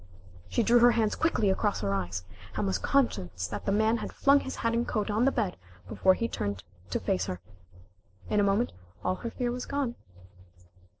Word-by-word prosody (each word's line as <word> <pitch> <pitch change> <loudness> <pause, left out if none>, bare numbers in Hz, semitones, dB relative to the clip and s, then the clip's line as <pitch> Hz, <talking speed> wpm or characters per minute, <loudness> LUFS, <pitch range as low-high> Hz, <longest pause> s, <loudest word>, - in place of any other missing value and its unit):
She 235 - +1
drew 240 +2 +5
her 240 0 +6
hands 220 -2 +1
quickly 220 -11 +2
across 205 +1 0
her 100 -1 0
eyes, 90 -2 -2 0.3
and - - 0
was 95 0 0
conscious 90 - 0
that 105 +3 -6
the - - +3
man 220 +3 +3
had - - -5
flung 280 +1 +4
his 265 - -5
hat 230 0 0
and 235 +1 0
coat 210 -1 -1
on 220 +4 +2
the 275 - +4
bed 210 -8 -1 0.3
before 185 - +3
he 230 - -1
turned 100 - -3 0.3
to - - -1
face 90 0 -1
her. 90 - -4 0.9
In 210 - +1
a - - +4
moment 200 +4 +2 0.3
all 185 +1 +1
her 235 - -4
fear 240 +1 -2
was 250 +1 -5
gone. 280 -4 -1
210 Hz, 200 wpm, -29 LUFS, -, 0.9 s, her